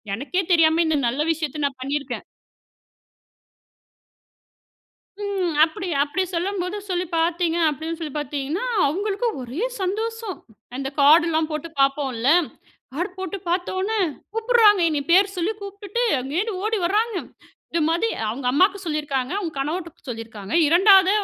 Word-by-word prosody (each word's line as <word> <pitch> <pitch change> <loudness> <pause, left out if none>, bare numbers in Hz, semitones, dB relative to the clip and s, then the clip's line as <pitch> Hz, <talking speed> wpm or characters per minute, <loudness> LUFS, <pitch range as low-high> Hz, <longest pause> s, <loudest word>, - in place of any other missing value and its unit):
எனக்கே 290 - -1
தெரியாம 325 0 +4
இந்த 315 -1 +2
நல்ல 255 +5 -1
விஷயத்த 310 -2 -3
நான் 265 -2 -10
பண்ணிருக்கேன். 280 +2 -3 3.0
ம். 385 -4 -1
அப்டி 370 +3 -5
அப்டி 295 +6 -1
சொல்லும்போது 365 +2 -2
சொல்லி 360 0 -1
பார்த்தீங்க, 335 0 +1
அப்டின்னு 315 +2 -4
சொல்லி 305 -4 -5
பாத்தீங்கன்னா, 295 - -3 0.2
அவங்களுக்கு 405 - -1
ஒரே 255 - -5 0.2
சந்தோஷம். 440 +1 -3 0.4
அந்தக் 270 +1 -5
கார்டுலாம் 315 +2 +5
போட்டு 305 +1 -4
பாப்போம்ல. 275 -3 +1 0.6
கார்டு 350 +7 -2
போட்டு 380 +1 -4
பாத்தவுனே, 375 +4 -1 0.3
"கூப்புடுறாங்க, 445 -3 +4
என்னய 295 -3 -1
பேர் 390 +2 +4
சொல்லி 360 +4 0
கூப்டுட்டு, 405 +3 -4 0.2
அங்கேருந்து 345 - -2
ஓடி 440 0 0
வர்றாங்க. 430 +4 +1 0.6
இது 335 - +1
மாதி 340 +7 +1 0.2
அவங்க 250 +3 -5
அம்மாவுக்கு 375 +8 +3
சொல்லியிருக்காங்க. 290 -4 -2
அவங்க 345 -6 -4
கணவர்ட்ட 330 +4 -4
சொல்லியிருக்காங்க. 225 -3 -7 0.2
2வதா 380 +3 +6
335 Hz, 120 wpm, -23 LUFS, 290-390 Hz, 3.0 s, 2வதா